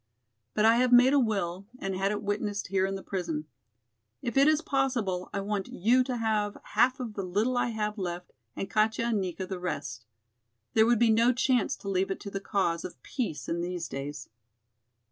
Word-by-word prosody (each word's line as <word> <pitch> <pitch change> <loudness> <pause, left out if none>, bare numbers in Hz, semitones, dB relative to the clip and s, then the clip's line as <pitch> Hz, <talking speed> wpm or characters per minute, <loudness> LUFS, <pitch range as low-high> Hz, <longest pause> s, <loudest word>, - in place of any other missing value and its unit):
But 215 - +3
I 225 +1 +6
have 250 0 +3
made 250 +2 +7
a 285 - +5
will 195 -5 -1
and 195 -6 -3
had 195 +1 +1
it 210 - -3
witnessed 205 -1 -2
here 190 0 +2
in 195 - -3
the 195 - -7
prison. 165 -5 -3 0.8
If 235 - -3
it 275 +1 +6
is 310 -1 +4
possible 255 - -1
I 200 - -2
want 200 -1 -2
you 240 +7 +3
to 250 -2 -2
have 215 -2 0 0.2
half 255 +2 +3
of 240 -4 -5
the 200 - -3
little 205 +7 0
I 245 - +2
have 210 -2 -2
left 175 -1 -5 0.2
and 195 - -3
Katja 220 +3 +1
and 215 -4 +1
Nika 185 0 -3
the 185 -1 -5
rest. 140 -10 -4 0.7
There 220 0 +5
would 240 0 +4
be 230 0 +4
no 230 +3 +5
chance 250 -2 +1
to - - -11
leave 190 0 +1
it 195 - -3
to 200 - -7
the 195 - -3
cause 185 -5 0
of 180 - -8
peace 170 - -3
in 170 +1 -1
these 175 -1 -3
days." 140 -1 -6
205 Hz, 205 wpm, -29 LUFS, 185-235 Hz, 0.8 s, made